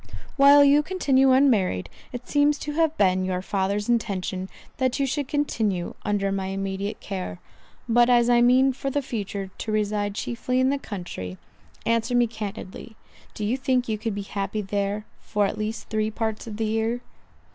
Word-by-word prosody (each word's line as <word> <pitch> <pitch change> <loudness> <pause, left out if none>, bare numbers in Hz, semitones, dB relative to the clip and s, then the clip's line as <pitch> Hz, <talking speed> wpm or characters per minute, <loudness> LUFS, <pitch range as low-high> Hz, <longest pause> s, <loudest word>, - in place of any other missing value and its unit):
"While 285 +1 +8
you 285 +1 +6
continue 275 -6 +3
unmarried, 225 - +3 0.2
it 245 0 -7
seems 290 0 +3
to 300 - -5
have 320 0 +1
been 185 -2 +3
your 185 0 -2
father's 200 +1 -1
intention 195 -5 -1 0.3
that 260 0 0
you 275 - +2
should 280 +1 -2
continue 220 -11 -1
under 200 -1 0
my 195 -1 -2
immediate 195 +1 -3
care; 185 - -5 0.5
but 240 +1 +4
as 240 -1 +5
I 240 -1 +5
mean 260 +2 +5
for 275 +1 -3
the 285 +1 -1
future 200 -5 -4
to 220 - -3
reside 205 -1 0
chiefly 250 +3 -2
in 260 +1 +3
the 280 - -1
country—answer 175 - -4
me 240 0 +5
candidly, 220 -1 -7 0.4
do 210 - -3
you 225 +5 +1
think 260 -2 +1
you 215 -2 -2
could 220 -2 -3
be 205 - -3
happy 200 +1 -3
there, 200 +1 -2
for 205 -1 0
at - - -2
least 215 +2 -4
three 215 0 0
parts 220 0 -3
of 210 -2 -6
the 225 - -1
year?" 225 +2 -1
220 Hz, 175 wpm, -25 LUFS, 200-255 Hz, 0.5 s, While